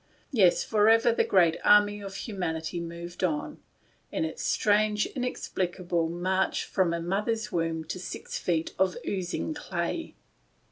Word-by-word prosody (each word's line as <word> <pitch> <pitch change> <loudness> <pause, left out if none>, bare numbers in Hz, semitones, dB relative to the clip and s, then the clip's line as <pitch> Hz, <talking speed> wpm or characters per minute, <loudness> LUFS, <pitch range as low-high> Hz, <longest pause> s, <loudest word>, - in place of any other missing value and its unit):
l - - -35
Yes, 180 -3 +5
forever 225 +2 +4
the 230 - +2
great 170 -4 +4
army 205 0 +5
of 195 -1 -7
humanity 175 -6 -3
moved 170 +1 -7
on, 155 -5 -1 0.5
on - - -1
its 160 - -5
strange 210 0 +2
inexplicable 180 - -2
march 185 +3 0
from 185 -3 +1
a 170 - -1
mother's 210 +5 -1
womb 165 -1 -1
to 170 +4 -6
six 180 - -6
feet 165 -2 -1
of 190 -1 +2
oozing 190 - -2
clay. 295 - -4
185 Hz, 140 wpm, -28 LUFS, 170-210 Hz, 0.5 s, Yes